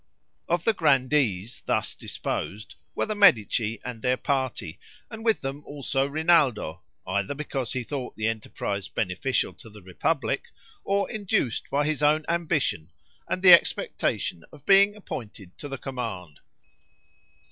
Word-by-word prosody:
Of 175 Hz, 0 st, +1 dB
the 225 Hz, -, +3 dB
Grandees 130 Hz, -, +1 dB
thus -, -, 0 dB
disposed, 105 Hz, +2 st, -4 dB, 0.2 s
were -, -, 0 dB
the 215 Hz, -, -2 dB
Medici 115 Hz, -, +4 dB
and 120 Hz, -3 st, -6 dB
their 125 Hz, +2 st, +1 dB
party, 130 Hz, -, -2 dB, 0.3 s
and 220 Hz, 0 st, -8 dB
with 225 Hz, -2 st, +2 dB
them 135 Hz, +2 st, -5 dB
also 140 Hz, -1 st, -1 dB
Rinaldo, 145 Hz, -, +2 dB, 0.2 s
either 100 Hz, +8 st, -1 dB
because 135 Hz, -4 st, -3 dB
he 130 Hz, -1 st, -2 dB
thought 130 Hz, 0 st, -5 dB
the 110 Hz, 0 st, -1 dB
enterprise 105 Hz, -3 st, -3 dB
beneficial 100 Hz, +7 st, -1 dB
to 115 Hz, -, -13 dB
the 105 Hz, -2 st, -14 dB
republic, 90 Hz, -1 st, -1 dB, 0.4 s
or 200 Hz, 0 st, +1 dB
induced 200 Hz, -, -1 dB
by 145 Hz, +1 st, +1 dB
his 155 Hz, -1 st, -1 dB
own 150 Hz, +1 st, +3 dB
ambition 150 Hz, -, 0 dB, 0.4 s
and 185 Hz, -, -2 dB
the 180 Hz, -2 st, +10 dB
expectation 85 Hz, -, +2 dB
of 145 Hz, -3 st, -16 dB
being 200 Hz, +1 st, +6 dB
appointed 105 Hz, -, -8 dB
to 145 Hz, -, -5 dB
the 135 Hz, -1 st, -5 dB
command. 115 Hz, -, -6 dB
135 Hz, 140 wpm, -26 LUFS, 110-155 Hz, 0.4 s, the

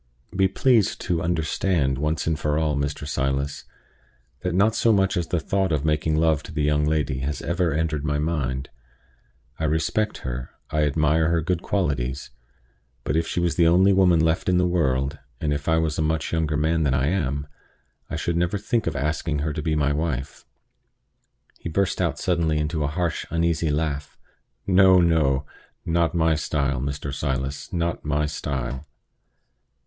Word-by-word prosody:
Be 95 Hz, 0 st, +4 dB
pleased 110 Hz, +1 st, +2 dB
to 85 Hz, -3 st, -1 dB
understand 80 Hz, -4 st, 0 dB
once 75 Hz, +2 st, 0 dB
for 75 Hz, -2 st, 0 dB
all, 75 Hz, -2 st, +1 dB
Mr. 70 Hz, 0 st, -3 dB
Silas, 70 Hz, +1 st, -2 dB, 0.7 s
that 90 Hz, -1 st, -2 dB
not 105 Hz, +4 st, +4 dB
so 115 Hz, -, +3 dB
much 95 Hz, -2 st, +2 dB
as 85 Hz, -2 st, -1 dB
the 85 Hz, -, 0 dB
thought 95 Hz, +4 st, 0 dB
of 75 Hz, -1 st, 0 dB
making 75 Hz, 0 st, +1 dB
love 80 Hz, -2 st, +2 dB
to -, -, -11 dB
the 75 Hz, -1 st, -1 dB
young 75 Hz, 0 st, +2 dB
lady 75 Hz, -4 st, 0 dB
has 70 Hz, +2 st, -3 dB
ever 85 Hz, -1 st, 0 dB
entered 75 Hz, -1 st, -1 dB
my 75 Hz, -1 st, 0 dB
head. 70 Hz, -4 st, -2 dB, 0.9 s
I 80 Hz, -, 0 dB
respect 80 Hz, +8 st, -1 dB
her; 60 Hz, 0 st, -4 dB, 0.2 s
I 75 Hz, 0 st, +2 dB
admire 80 Hz, +2 st, +2 dB
her 85 Hz, 0 st, +2 dB
good 90 Hz, +1 st, -1 dB
qualities; 70 Hz, -10 st, -2 dB, 0.7 s
but -, -, -1 dB
if 80 Hz, 0 st, +1 dB
she -, -, -2 dB
was 85 Hz, -1 st, 0 dB
the 85 Hz, -, +5 dB
only 95 Hz, +4 st, +5 dB
woman 90 Hz, -3 st, +4 dB
left 80 Hz, +2 st, +1 dB
in 90 Hz, -, +3 dB
the 90 Hz, -, +3 dB
world, 70 Hz, -5 st, 0 dB, 0.2 s
and 75 Hz, -1 st, 0 dB
if 70 Hz, -1 st, -4 dB
I 80 Hz, -, +3 dB
was 80 Hz, -2 st, 0 dB
a -, -, +2 dB
much 80 Hz, +1 st, -1 dB
younger 80 Hz, -2 st, 0 dB
man 80 Hz, +2 st, +1 dB
than 70 Hz, -4 st, +2 dB
I 65 Hz, 0 st, +1 dB
am, 70 Hz, -6 st, -1 dB, 0.6 s
I -, -, -3 dB
should 85 Hz, -1 st, -1 dB
never 90 Hz, +3 st, +1 dB
think 115 Hz, +2 st, -1 dB
of 80 Hz, -, -1 dB
asking 75 Hz, +2 st, -1 dB
her 75 Hz, -, -1 dB
to 75 Hz, -, -3 dB
be 80 Hz, 0 st, 0 dB
my 70 Hz, -1 st, +1 dB
wife." 70 Hz, -3 st, -3 dB, 1.1 s
He -, -, -5 dB
burst 95 Hz, +3 st, 0 dB
out 80 Hz, -5 st, 0 dB
suddenly 85 Hz, -3 st, 0 dB
into 75 Hz, +1 st, -1 dB
a -, -, +1 dB
harsh, 85 Hz, +2 st, -2 dB
uneasy 85 Hz, -1 st, 0 dB
laugh. 75 Hz, -1 st, -2 dB, 0.5 s
"No, 95 Hz, -1 st, +6 dB
no! 75 Hz, -5 st, +2 dB, 0.4 s
not 85 Hz, -1 st, +1 dB
my 80 Hz, -1 st, +3 dB
style, 70 Hz, -4 st, -1 dB
Mr. 70 Hz, 0 st, -4 dB
Silas 70 Hz, +2 st, -3 dB
not 85 Hz, -2 st, -2 dB
my 75 Hz, 0 st, 0 dB
style!" 70 Hz, -1 st, -4 dB
80 Hz, 175 wpm, -24 LUFS, 70-85 Hz, 1.1 s, No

